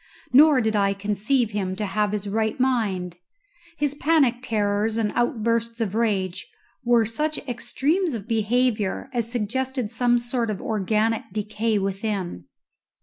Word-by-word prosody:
Nor 290 Hz, 0 st, +7 dB
did 220 Hz, -1 st, 0 dB
I 200 Hz, -1 st, +2 dB
conceive 210 Hz, +4 st, 0 dB
him 190 Hz, -3 st, -2 dB
to 210 Hz, +2 st, -3 dB
have 210 Hz, +1 st, 0 dB
his 210 Hz, -1 st, -3 dB
right 220 Hz, +4 st, -1 dB
mind. 200 Hz, -9 st, 0 dB, 0.6 s
His 290 Hz, -1 st, 0 dB
panic 290 Hz, -4 st, +2 dB
terrors 215 Hz, -2 st, 0 dB
and 215 Hz, -2 st, 0 dB
outbursts 230 Hz, -2 st, 0 dB
of 215 Hz, -4 st, -1 dB
rage 195 Hz, -5 st, -1 dB, 0.3 s
were 240 Hz, -2 st, +4 dB
such 300 Hz, +8 st, -1 dB
extremes 280 Hz, +7 st, 0 dB
of 215 Hz, -1 st, -7 dB
behaviour 225 Hz, 0 st, 0 dB
as 235 Hz, -2 st, -1 dB
suggested 250 Hz, +1 st, -2 dB
some 240 Hz, +1 st, +2 dB
sort 240 Hz, -1 st, -1 dB
of 210 Hz, -, -3 dB
organic 220 Hz, +1 st, 0 dB
decay 215 Hz, +2 st, -1 dB
within. 195 Hz, -, -3 dB
225 Hz, 140 wpm, -24 LUFS, 205-245 Hz, 0.6 s, Nor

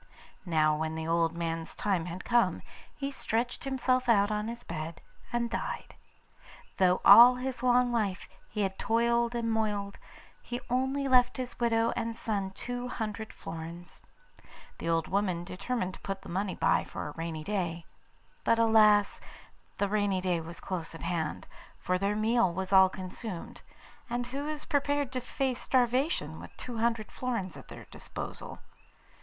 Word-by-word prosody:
Now 155 Hz, -2 st, +3 dB
when 160 Hz, 0 st, -2 dB
the 160 Hz, 0 st, -4 dB
old 165 Hz, 0 st, +2 dB
man's 165 Hz, -1 st, -3 dB
time 185 Hz, -5 st, 0 dB
had 180 Hz, +2 st, -6 dB
come, 240 Hz, -1 st, +2 dB, 0.3 s
he 280 Hz, -1 st, -3 dB
stretched 240 Hz, -2 st, -2 dB
himself 255 Hz, -1 st, +1 dB
out 205 Hz, -2 st, +4 dB
on 210 Hz, 0 st, -1 dB
his 235 Hz, +1 st, -6 dB
bed 160 Hz, 0 st, -5 dB, 0.3 s
and 240 Hz, 0 st, 0 dB
died. 230 Hz, -, -4 dB, 0.8 s
Though 185 Hz, -1 st, +3 dB
all 245 Hz, +2 st, +10 dB
his 250 Hz, -1 st, -4 dB
life -, -, -10 dB
long 240 Hz, -6 st, +3 dB, 0.3 s
he 210 Hz, -, -3 dB
had 190 Hz, -1 st, -1 dB
toiled 235 Hz, +1 st, +2 dB
and 230 Hz, -1 st, 0 dB
moiled, 210 Hz, -2 st, -1 dB, 0.4 s
he 245 Hz, 0 st, -5 dB
only 265 Hz, +2 st, +1 dB
left 250 Hz, -1 st, +4 dB
his 255 Hz, -1 st, -5 dB
widow 230 Hz, -1 st, +2 dB
and 230 Hz, 0 st, -2 dB
son 200 Hz, -4 st, -2 dB
two 245 Hz, +5 st, -5 dB
hundred 220 Hz, -2 st, -4 dB
florins. 165 Hz, +2 st, -8 dB, 0.8 s
The -, -, -3 dB
old 165 Hz, -1 st, +1 dB
woman 190 Hz, -3 st, 0 dB
determined 190 Hz, +2 st, -3 dB
to -, -, -11 dB
put 195 Hz, 0 st, -5 dB
by -, -, -18 dB
the -, -, -5 dB
money 195 Hz, 0 st, -1 dB, 0.3 s
for -, -, -6 dB
a -, -, -5 dB
rainy 165 Hz, -1 st, -4 dB
day; 175 Hz, -4 st, -2 dB, 0.6 s
but 230 Hz, -, +3 dB
alas! 215 Hz, -2 st, +5 dB, 0.6 s
the 200 Hz, -, +1 dB
rainy 205 Hz, -2 st, +1 dB
day 180 Hz, -2 st, 0 dB
was 165 Hz, +2 st, -8 dB
close 170 Hz, -3 st, -5 dB
at -, -, -9 dB
hand, 165 Hz, -3 st, -2 dB, 0.3 s
for 185 Hz, 0 st, -1 dB
their 200 Hz, +2 st, 0 dB
meal 220 Hz, -2 st, +3 dB
was 190 Hz, +2 st, -3 dB
all 190 Hz, -1 st, +8 dB
consumed, 185 Hz, 0 st, -7 dB, 0.5 s
and 240 Hz, +1 st, -1 dB
who 275 Hz, +4 st, -4 dB
is 305 Hz, -1 st, -4 dB
prepared 285 Hz, -2 st, 0 dB
to 255 Hz, -1 st, -2 dB
face 255 Hz, 0 st, -2 dB
starvation 255 Hz, +5 st, +1 dB
with -, -, -12 dB
two 240 Hz, -3 st, -6 dB
hundred 230 Hz, -2 st, 0 dB
florins 230 Hz, -9 st, -3 dB
at -, -, -12 dB
their -, -, -10 dB
disposal? -, -, -7 dB
215 Hz, 160 wpm, -30 LUFS, 180-245 Hz, 0.8 s, all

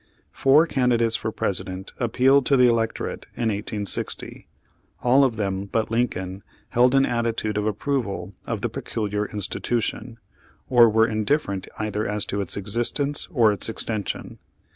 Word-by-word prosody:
Four 145 Hz, +4 st, +4 dB
candidates 120 Hz, -6 st, +1 dB
for 110 Hz, -, -2 dB
President 95 Hz, -2 st, -3 dB
appealed 130 Hz, +3 st, +3 dB
to 140 Hz, -, +4 dB
the 125 Hz, -1 st, +6 dB
electorate 115 Hz, -1 st, -1 dB
in 115 Hz, -2 st, 0 dB
1860. 105 Hz, 0 st, -3 dB, 0.6 s
All 130 Hz, +3 st, +5 dB
of 130 Hz, -4 st, +1 dB
them 100 Hz, -2 st, -2 dB
but 110 Hz, +2 st, -2 dB
Lincoln 95 Hz, -5 st, -1 dB, 0.3 s
held 125 Hz, +2 st, +4 dB
an 135 Hz, 0 st, +5 dB
attitude 115 Hz, -3 st, -1 dB
of 105 Hz, 0 st, 0 dB
approval 105 Hz, -5 st, -2 dB
of -, -, -3 dB
the -, -, -1 dB
peculiar 105 Hz, -1 st, -3 dB
institution, 115 Hz, +3 st, -3 dB, 0.5 s
or 120 Hz, -2 st, +6 dB
were 110 Hz, +1 st, +4 dB
indifferent 110 Hz, -2 st, -1 dB
either 105 Hz, 0 st, -2 dB
as 105 Hz, 0 st, -2 dB
to 100 Hz, -, -2 dB
its 100 Hz, -, -3 dB
existence 120 Hz, +8 st, 0 dB
or 115 Hz, -6 st, +4 dB
its 105 Hz, -, -1 dB
extension. 110 Hz, -3 st, -3 dB
110 Hz, 140 wpm, -24 LUFS, 105-125 Hz, 0.6 s, the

